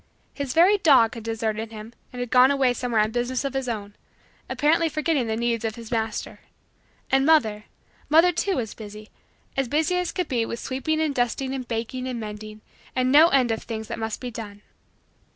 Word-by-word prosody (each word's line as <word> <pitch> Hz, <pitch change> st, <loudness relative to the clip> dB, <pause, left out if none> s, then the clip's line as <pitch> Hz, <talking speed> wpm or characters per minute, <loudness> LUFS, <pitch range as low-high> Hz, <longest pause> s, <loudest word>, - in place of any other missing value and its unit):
His 280 Hz, -3 st, -4 dB
very 375 Hz, +5 st, +5 dB
dog 260 Hz, -10 st, +5 dB
had 230 Hz, -, -7 dB
deserted 225 Hz, 0 st, -3 dB
him 220 Hz, +1 st, -9 dB, 0.2 s
and 250 Hz, -, -8 dB
had 245 Hz, -1 st, -4 dB
gone 255 Hz, +1 st, +7 dB
away 270 Hz, -3 st, +2 dB
somewhere 240 Hz, -2 st, 0 dB
on 215 Hz, +1 st, 0 dB
business 245 Hz, +3 st, -1 dB
of 275 Hz, -, -2 dB
his 270 Hz, -2 st, -2 dB
own, 205 Hz, -3 st, -5 dB, 0.5 s
apparently 325 Hz, +2 st, +2 dB
forgetting 305 Hz, -4 st, 0 dB
the 220 Hz, -, -1 dB
needs 235 Hz, -1 st, -1 dB
of 220 Hz, -1 st, -2 dB
his 230 Hz, -1 st, -10 dB
master. 225 Hz, -2 st, -3 dB, 0.7 s
And 270 Hz, 0 st, +4 dB
mother 225 Hz, -9 st, +3 dB, 0.4 s
mother 330 Hz, +4 st, +6 dB
too 380 Hz, +3 st, -1 dB
was 230 Hz, -6 st, -3 dB
busy, 215 Hz, 0 st, -10 dB, 0.5 s
as 270 Hz, -1 st, 0 dB
busy 315 Hz, +7 st, +1 dB
as 360 Hz, -1 st, -1 dB
could 360 Hz, -3 st, -2 dB
be 240 Hz, -3 st, 0 dB
with 235 Hz, -, -4 dB
sweeping 275 Hz, +4 st, -2 dB
and 310 Hz, -2 st, 0 dB
dusting 260 Hz, +2 st, -1 dB
and 260 Hz, -2 st, -5 dB
baking 240 Hz, +3 st, -3 dB
and 250 Hz, -2 st, -4 dB
mending 215 Hz, 0 st, -8 dB, 0.3 s
and 255 Hz, 0 st, +1 dB
no 305 Hz, +4 st, +8 dB
end 260 Hz, -7 st, +3 dB
of 225 Hz, -, -2 dB
things 220 Hz, -2 st, -6 dB
that -, -, -4 dB
must 220 Hz, -1 st, -3 dB
be 250 Hz, -1 st, -6 dB
done. 210 Hz, -2 st, -9 dB
245 Hz, 200 wpm, -24 LUFS, 225-280 Hz, 0.7 s, no